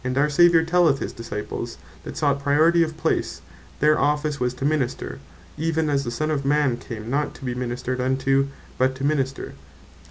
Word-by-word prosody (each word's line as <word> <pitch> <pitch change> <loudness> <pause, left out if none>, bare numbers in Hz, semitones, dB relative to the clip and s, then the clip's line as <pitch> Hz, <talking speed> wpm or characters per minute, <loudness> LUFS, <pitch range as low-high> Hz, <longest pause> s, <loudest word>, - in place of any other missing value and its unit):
our 145 +2 +2
Saviour 170 +1 +5
telleth 165 -3 +3
his - - -5
Disciples, 115 -3 -5 0.3
that - - -8
sought 140 -2 +1
Priority 155 +4 +4
of 160 -1 -1
place, - - -1 0.4
their 150 +1 +4
Office 150 +1 0
was 125 0 -1
to 135 - -4
minister, 145 - -1 0.4
even 160 -1 0
as 140 -1 +1
the 120 - -3
Son 155 +6 -2
of 140 -2 -1
man 145 -2 +2
came, 110 -3 -8
not 145 +4 -1
to 135 - -10
be 125 - -1
ministred 125 +1 -3
unto, 135 +1 +1 0.3
but 130 +1 +2
to 135 - -7
minister. 135 -2 -1
140 Hz, 180 wpm, -23 LUFS, 130-155 Hz, 0.4 s, Saviour